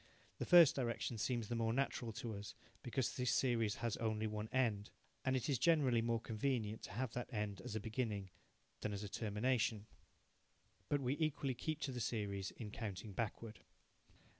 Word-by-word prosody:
The - - -2
first 170 -5 +9
direction 120 -2 -1
seems 120 -1 0
the 120 - -2
more 115 -1 +1
natural 125 -2 0
to 115 0 -4
us, 100 0 -7 0.3
because 125 0 -1
this 125 -1 0
series 115 -5 +2
has 115 - 0
only 110 -1 0
one 105 0 -3
end, 110 -6 +1 0.3
and 130 0 +2
it 130 - 0
is 135 -5 +1
generally 145 -9 +4
more 115 0 +1
convenient 110 -1 -1
to - - -9
have 120 +1 -2
that 125 +1 -4
end 105 -4 -2
as 110 - -5
a - - +1
beginning 105 -3 -2 0.5
than 105 - -2
as 100 +1 -3
a 105 - -4
termination. 110 +1 0 1.0
But 145 -1 +2
we 130 +1 +1
equally 145 -4 +1
keep 155 +5 -3
to 135 - -1
the 125 - -4
series 100 -4 -1
in 105 -3 -7
counting 105 -2 -5
backward. 110 +1 -3
115 Hz, 180 wpm, -39 LUFS, 105-130 Hz, 1.0 s, first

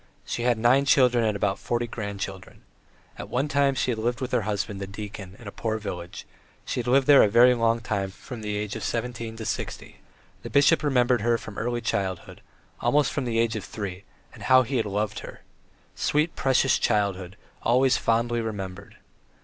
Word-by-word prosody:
She - - -3
had 120 -1 +2
nine 125 +5 +4
children 125 -3 +4
and 110 -2 +1
about 100 -1 -1
forty 120 0 -1
grandchildren. 100 -4 -6 0.6
At 100 - -7
one 130 +6 0
time, 140 -1 +2
she 125 +1 0
had 115 - -3
lived 120 +1 -1
with 130 0 -4
her 125 - +2
husband, 100 -1 -3
the 100 - -4
deacon, 100 -2 -8
in 115 - -12
a - - -5
poor 110 +1 -2
village; 90 -5 -7 0.4
she - - -3
had 120 - -4
lived 135 +2 +4
there 145 0 +8
a 105 - +4
very 120 +4 +6
long 115 -1 +1
time 100 -3 -2
from 115 +4 -10
the 105 -1 -3
age 105 -1 -4
of - - -5
seventeen 115 -1 -3
to 110 - -6
sixty. - - -5 0.4
The - - -7
bishop 145 +3 +4
remembered 125 -5 +2
her 115 +1 +2
from 110 -2 -10
early 120 +1 -2
childhood, 95 -5 -3 0.4
almost 145 -2 +2
from 140 -3 -2
the 115 -2 -1
age 115 -1 +1
of 105 - -4
three, 100 -3 -6 0.3
and - - -14
how 130 0 +5
he 130 +2 -2
had 115 - 0
loved 105 +1 -2
her! - - -10 0.5
Sweet, 150 +3 0
precious 135 0 +2
childhood, 100 -3 0 0.2
always 130 +2 +3
fondly 115 +1 +1
remembered! 100 -3 -6
115 Hz, 195 wpm, -25 LUFS, 105-125 Hz, 0.6 s, there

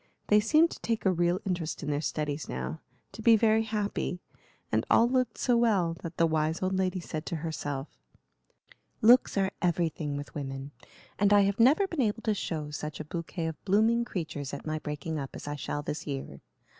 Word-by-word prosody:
They 210 - +6
seemed 310 +10 +4
to - - -8
take 230 -2 -2
a 190 - +5
real 175 +1 +1
interest 175 -4 -2
in 150 - -2
their 145 0 0
studies 150 -1 -3
now, 65 +5 -4 0.3
to 210 - -9
be 230 0 +7
very 220 0 +4
happy; 210 -4 -2 0.5
and - - +2
all 230 - +6
looked 250 -2 0
so 245 - +2
well 200 -8 +2
that 165 0 -7
the 165 - +4
wise 160 +2 0
old 185 +1 0
lady 185 -1 0
said 155 -2 -5
to - - -2
herself: 145 -3 -3 1.2
"Looks 240 -1 +6
are 195 -1 +2
everything 165 -4 0
with 145 - -7
women, 135 -1 -5 0.5
and 200 0 +4
I 205 0 +7
have 200 +1 +1
never 280 - +5
been 335 -7 -2
able 225 -1 0
to 215 - +2
show 155 -6 -4
such 150 0 -5
a 155 - -5
bouquet 170 +1 -4
of 160 -1 -5
blooming 220 +4 +3
creatures 155 - -4
at - - -9
my 155 0 -2
breaking 150 +1 -4
up 135 -1 -6
as - - -8
I 145 - -3
shall 145 0 -4
this 150 - -5
year. 135 - -5
175 Hz, 200 wpm, -29 LUFS, 150-215 Hz, 1.2 s, be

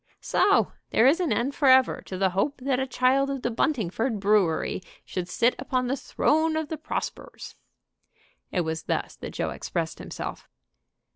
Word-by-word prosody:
"So - - +3 0.2
there 225 - +4
is 290 +7 +5
an 355 -4 0
end 260 +4 0
forever 260 -2 +4
to 185 - -5
the 190 0 +2
hope 200 +10 0
that 260 -1 0
a 265 - -1
child 265 +2 +2
of 275 -2 -4
the 240 - 0
Buntingford 225 - 0
Brewery 195 -5 +2 0.2
should 180 -1 -4
sit 235 +6 +2
upon 260 -1 -1
the 255 +2 0
throne 315 +3 +1
of 315 -2 -3
the 315 - -3
Prospers." - - -5 1.0
It 180 - +1
was 160 -1 -3
thus - - -2
that - - -7
Joe - - -3
expressed - - -4
himself. - - -7
255 Hz, 165 wpm, -26 LUFS, 200-275 Hz, 1.0 s, is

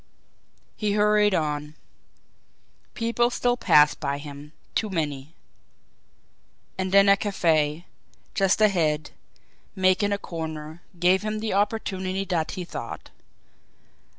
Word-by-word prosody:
He 210 -2 -1
hurried 210 -1 +3
on. 150 -1 -2 1.2
People 235 +1 +1
still 245 0 0
passed 150 -10 +4
by 140 -1 -2
him 145 0 -10 0.2
too 215 - -1
many. 150 -4 -4 1.4
And 190 0 -3
then 200 +1 +6
a 200 - +7
cafe, 165 -5 0 0.5
just 195 +1 +2
ahead, 160 -7 +2 0.6
making 190 +2 +2
a 200 - +1
corner, 160 -3 -7 0.2
gave 180 +2 +3
him 215 0 -3
the 220 -2 -2
opportunity 195 -2 -1
that 170 -5 -1
he 180 - -4
sought. 115 - -8
185 Hz, 110 wpm, -25 LUFS, 155-205 Hz, 1.4 s, a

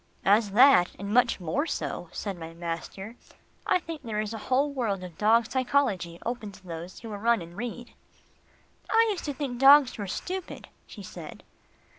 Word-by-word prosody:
"As 205 +2 +4
that, 230 -3 +6
and 200 +2 -5
much 245 -2 +3
more 220 - -1
so," - - -4
said 200 -2 -4
my 165 -1 -9
master. 175 +6 -6 0.5
"I - - +4
think 330 -4 -7
there 225 -5 -4
is 215 +1 -3
a 225 - -5
whole 275 +3 +2
world 210 -8 -2
of 180 -3 -9
dog 220 +4 +3
psychology 240 -10 0
open 235 -3 -4
to 195 0 -16
those 170 +1 -8
who 230 - -8
will 210 - -5
run 235 +1 +3
and 170 0 -10
read." 240 +2 -6 1.0
"I 455 0 +4
used 390 - -4
to 290 - -2
think 260 -4 -4
dogs 275 -2 +7
were 200 - -4
stupid," 370 - -5 0.2
she - - -10
said. - - -10
225 Hz, 180 wpm, -27 LUFS, 190-265 Hz, 1.0 s, dogs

